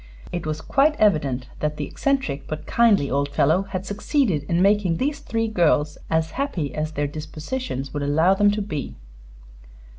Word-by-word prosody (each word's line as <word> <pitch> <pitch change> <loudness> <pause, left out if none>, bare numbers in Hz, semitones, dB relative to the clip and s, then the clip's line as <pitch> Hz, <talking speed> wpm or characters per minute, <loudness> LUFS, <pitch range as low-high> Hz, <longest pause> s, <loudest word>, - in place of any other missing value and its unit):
It 175 -3 -4
was 155 0 -3
quite 290 - +2
evident 140 - +1
that 150 0 -2
the 145 - -2
eccentric 265 - -1
but 155 0 -5
kindly 215 -11 +3
old 140 +1 0
fellow 145 +5 +3
had 195 -1 -5
succeeded 205 - 0
in 170 - +2
making 195 -3 +3
these 285 +2 -1
three 225 -5 -2
girls 155 -7 +2
as 160 0 +1
happy 195 - -2
as 155 +1 -3
their 145 -1 -1
dispositions 155 - -5
would 145 - -2
allow 160 +6 +3
them 205 +1 +4
to 205 0 -1
be. 155 -8 -5
165 Hz, 170 wpm, -23 LUFS, 150-210 Hz, -, them